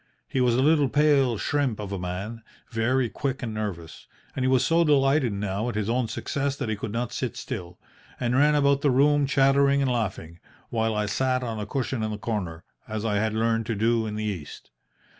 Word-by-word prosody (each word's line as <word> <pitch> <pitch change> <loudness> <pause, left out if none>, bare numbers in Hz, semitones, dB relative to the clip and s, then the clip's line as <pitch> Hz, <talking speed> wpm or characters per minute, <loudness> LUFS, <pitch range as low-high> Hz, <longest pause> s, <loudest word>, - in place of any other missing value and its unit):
He 130 - -1
was 120 -2 +3
a 130 - +2
little 150 -2 +4
pale 140 -5 +3
shrimp 135 -2 0
of 100 -2 -5
a 100 - -3
man, 95 +6 -5 0.3
very 120 +3 +1
quick 135 +2 -3
and 115 -2 -3
nervous, 95 -7 -6 0.3
and 130 - -1
he - - +2
was 130 -2 +3
so 165 +1 +3
delighted 140 -4 +3
now 100 +3 -2
at 120 - -5
his 105 +1 -1
own 125 -1 +1
success 140 +4 -2
that 120 - -4
he 110 - 0
could 105 +1 -5
not 120 +1 -3
sit 130 - -3
still, 90 -8 -6 0.4
but 120 -2 0
ran 145 +4 +4
about 140 -1 +3
the 145 - +3
room 145 +2 +3
chattering 140 +1 +4
and 135 -2 +1
laughing, 95 -8 -3 0.3
while 110 -1 0
I 105 0 0
sat 130 +4 0
on 115 -3 -4
a 105 - -4
cushion 130 0 -2
in 110 - -1
the 105 - -4
corner, 95 -7 -4 0.2
as 110 0 -4
I 105 -2 +1
had 110 +1 0
learned 115 0 0
to 115 - -1
do 115 +2 +1
in 105 - -4
the 110 - -3
East. 90 -9 -6
115 Hz, 215 wpm, -26 LUFS, 105-135 Hz, 0.4 s, little